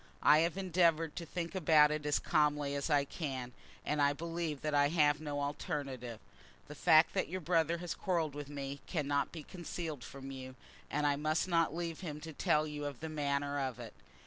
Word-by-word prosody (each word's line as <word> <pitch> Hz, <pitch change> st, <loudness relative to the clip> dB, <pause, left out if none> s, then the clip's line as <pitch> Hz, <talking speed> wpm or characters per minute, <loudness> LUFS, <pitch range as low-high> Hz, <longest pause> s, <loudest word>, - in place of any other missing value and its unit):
I 150 Hz, -, +7 dB
have 170 Hz, +2 st, +1 dB
endeavoured 170 Hz, -4 st, +2 dB
to 170 Hz, -2 st, -5 dB
think 170 Hz, +2 st, -4 dB
about 155 Hz, -5 st, +5 dB
it 150 Hz, -1 st, -2 dB
as 145 Hz, -, +3 dB
calmly 150 Hz, -2 st, +1 dB
as 140 Hz, +2 st, -2 dB
I 145 Hz, -2 st, +3 dB
can, 135 Hz, -5 st, -4 dB, 0.3 s
and 150 Hz, 0 st, 0 dB
I 145 Hz, 0 st, +4 dB
believe 165 Hz, -2 st, -3 dB
that 150 Hz, -1 st, -2 dB
I 145 Hz, 0 st, +5 dB
have 150 Hz, -1 st, +3 dB
no 145 Hz, -2 st, -3 dB
alternative. 135 Hz, -5 st, -4 dB, 0.5 s
The -, -, -8 dB
fact -, -, +5 dB
that -, -, 0 dB
your 185 Hz, +2 st, -3 dB
brother 165 Hz, -1 st, +1 dB
has 175 Hz, -1 st, -4 dB
quarrelled 165 Hz, -6 st, -1 dB
with 145 Hz, -1 st, -7 dB
me 140 Hz, -1 st, -5 dB
cannot 145 Hz, -4 st, 0 dB
be 160 Hz, -3 st, -7 dB
concealed 165 Hz, -6 st, -6 dB
from 135 Hz, +2 st, -8 dB
you, 130 Hz, -1 st, -8 dB, 0.3 s
and 150 Hz, +1 st, 0 dB
I 145 Hz, -1 st, +2 dB
must 155 Hz, +4 st, 0 dB
not 165 Hz, -3 st, +2 dB
leave 170 Hz, -2 st, -3 dB
him 150 Hz, -5 st, -5 dB
to 160 Hz, 0 st, -7 dB
tell 150 Hz, +1 st, +2 dB
you 150 Hz, -1 st, -5 dB
of 145 Hz, -3 st, -5 dB
the 160 Hz, -, -5 dB
manner 145 Hz, -1 st, -1 dB
of 130 Hz, -3 st, -2 dB
it. 115 Hz, -2 st, -8 dB
150 Hz, 200 wpm, -34 LUFS, 140-165 Hz, 0.5 s, I